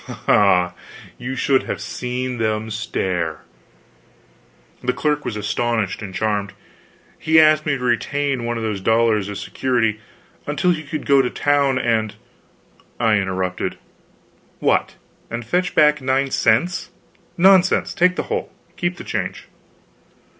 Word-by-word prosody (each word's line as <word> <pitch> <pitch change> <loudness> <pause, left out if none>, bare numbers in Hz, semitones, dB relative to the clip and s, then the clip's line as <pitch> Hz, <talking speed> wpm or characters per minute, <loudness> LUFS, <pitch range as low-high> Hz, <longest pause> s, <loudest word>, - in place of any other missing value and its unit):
Ah, 90 -3 +4 0.5
you 130 +2 -4
should 135 +1 +2
have - - -3
seen 125 0 -4
them 110 0 -1
stare! 95 -6 -2 1.4
The 125 0 +1
clerk 150 +3 -1
was 105 - -4
astonished 105 0 -1
and 100 -2 -6
charmed. 100 0 -1 0.7
He 160 +1 +4
asked 155 -1 +4
me 140 -2 +1
to 125 - -7
retain 135 +2 0
one 120 0 -2
of 115 - -4
the 105 -3 -2
dollars 110 -1 +2
as 100 - -5
security, 115 -5 -1 0.5
until 180 +5 +1
he 160 -3 -1
could 155 0 -6
go 140 -2 +5
to 125 - -1
town 140 -1 +1
and 110 -4 0 0.8
I 110 -2 +3
interrupted: 95 -2 -2 0.8
"What, - - +1 0.3
and 115 0 -5
fetch 180 +8 -1
back 150 -2 +4
nine 135 +1 0
cents? 130 +13 +1 0.5
Nonsense! 190 +1 +4
Take 180 +1 +3
the - - -2
whole. - - -3 0.3
Keep 175 0 -2
the - - -8
change." - - -4
120 Hz, 135 wpm, -20 LUFS, 110-145 Hz, 1.4 s, go